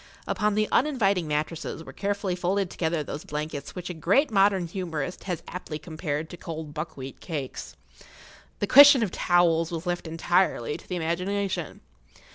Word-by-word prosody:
Upon 210 -1 0
the 215 0 +2
uninviting 200 - +2
mattresses[Pg 150 +2 -2
14] - - -18
were - - -10
carefully 200 -2 -1
folded 185 +1 0
together 160 -2 -1
those 145 +1 -6
blankets 150 -1 -5
which 180 -1 -5
a - - -5
great 200 - +2
modern 195 -3 +3
humorist 170 -2 -4
has 175 -4 -3
aptly 175 -4 -6
compared 155 -1 -4
to 175 - -8
cold 160 -3 -7
buckwheat 145 -4 -6
cakes. 145 -7 -6 0.8
The - - 0
question 280 +1 +9
of 200 - -1
towels 170 -2 +3
was 170 0 -5
left 175 -1 -2
entirely 165 -4 +1
to - - -12
the 180 - -2
imagination. 180 +4 -2
175 Hz, 160 wpm, -26 LUFS, 160-195 Hz, 0.8 s, question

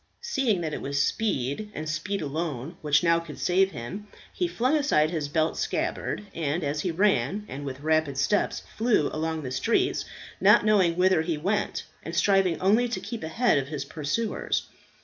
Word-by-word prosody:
Seeing 265 - +1
that 155 -2 -3
it - - -4
was 140 0 -2
speed, 145 - -1
and 155 +1 -4
speed 165 +5 -2
alone, 150 0 -4
which 145 0 +3
now 170 -1 +4
could 165 -3 -9
save 190 +2 +3
him, 190 - -7 0.3
he 355 - 0
flung 260 -2 +1
aside 170 - +2
his 155 -4 -2
belt 155 +2 0
scabbard - - -2
and 160 +1 -1
as 145 +1 -1
he 185 - -1
ran, 190 - +1
and 140 +2 -6
with 135 0 -6
rapid 155 -2 +1
steps 170 +10 +1 0.2
flew 220 -10 +2
along 160 0 -2
the 130 - -5
streets, 230 - +1 0.3
not - - +6
knowing 190 -6 +4
whither 185 -2 +4
he 160 -1 -2
went, 200 +7 -1 0.2
and 165 - -6
striving 190 -2 +3
only 215 +6 +3
to 235 - -2
keep 235 -2 -6
ahead 195 - +2
of 135 - -4
his 145 -2 -4
pursuers. 160 +10 -2
165 Hz, 180 wpm, -26 LUFS, 150-205 Hz, 0.3 s, not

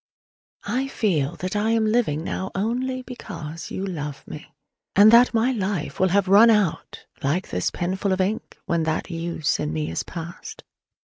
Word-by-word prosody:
I 255 +6 -1
feel 175 - 0
that 185 +3 -4
I 210 +2 +1
am 225 -1 +2
living 215 -9 +1
now 190 +2 -3
only 255 +5 -1
because 165 - -8
you 190 - -4
love 150 -6 -5
me: 155 - -9 0.4
and 205 +2 +8
that 240 +2 +7
my 230 +3 +2
life 195 - -3
will 190 - +4
have 195 +1 +2
run 205 +5 +7
out, 210 -7 0 0.2
like 155 +7 -1
this 90 - 0
penful 190 +3 -2
of 190 - 0
ink, 195 +4 -2
when 170 -1 0
that 160 +3 -2
use 165 -2 -1
in 75 - -2
me 80 0 -2
is 80 - -2
past. 175 - -8
190 Hz, 170 wpm, -23 LUFS, 165-220 Hz, 0.4 s, and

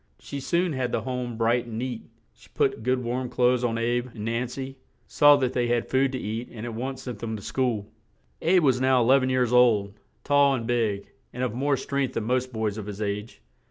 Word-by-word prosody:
She 140 - -7
soon 170 +4 0
had 130 -2 -2
the - - 0
home 125 -3 -4
bright 120 +1 +1
and 110 -2 -6
neat; 125 -1 -3 0.3
she - - -21
put - - +1
good 125 +2 0
warm 125 +1 -2
clothes 125 0 +2
on 115 -1 0
"Abe" 120 +2 0
and 105 -1 -5
Nan 115 +2 -1
cy; 135 +2 -6 0.3
saw 145 0 +6
that 130 -3 0
they 120 -1 +1
had 120 -1 -1
food 135 0 +3
to - - -1
eat 115 +1 -4
and 110 -1 -7
at 120 - -5
once 130 +3 -5
sent 120 -5 -6
them 110 -1 -4
to 105 - -7
school. 120 -5 -1 0.6
"Abe" 180 +1 +4
was 130 -3 +3
now 130 -2 +4
e - - 0
lev 135 +3 +5
en 130 - 0
years 125 -2 +1
old, 110 -5 +4 0.3
tall 140 -1 +4
and 115 -3 -4
big, 110 -4 0 0.3
and 125 - -4
of 125 -4 -1
more 140 +3 +1
strength 140 0 -2
than 115 - -1
most 125 +2 0
boys 110 -2 -2
of 105 - -7
his 105 -1 -6
age. 105 - -4
125 Hz, 230 wpm, -26 LUFS, 115-130 Hz, 0.6 s, saw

